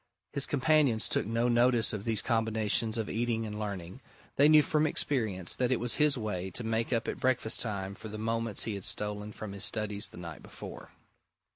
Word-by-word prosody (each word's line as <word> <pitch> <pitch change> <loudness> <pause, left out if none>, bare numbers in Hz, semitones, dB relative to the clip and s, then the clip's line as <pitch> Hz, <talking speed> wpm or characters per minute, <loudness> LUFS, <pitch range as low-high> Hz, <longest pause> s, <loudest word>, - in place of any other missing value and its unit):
His 140 - -1
companions 140 -5 +2
took - - 0
no 115 +2 +1
notice 120 -2 +3
of 105 -1 -5
these 115 -3 0
combinations 110 -1 +1
of 110 -2 -2
eating 115 -1 -1
and 105 -1 -6
learning: 100 +1 -6 0.3
they 145 +2 +6
knew 155 -1 +7
from 155 +1 +1
experience 110 - +1
that 125 0 0
it 130 - +2
was 120 0 +1
his 150 -2 +4
way 95 -5 -3
to 105 +6 -5
make 115 +1 -1
up 115 -1 0
at - - -3
breakfast 125 -3 +2
time 100 -4 -3
for 110 - -10
the 110 0 -7
moments 115 0 0
he 110 - -2
had 100 -2 -6
stolen 105 +1 -2
from 105 0 -7
his 100 0 -1
studies 105 -1 -2
the - - -14
night 85 -3 -8
before. - - -10
110 Hz, 205 wpm, -30 LUFS, 105-120 Hz, 0.3 s, knew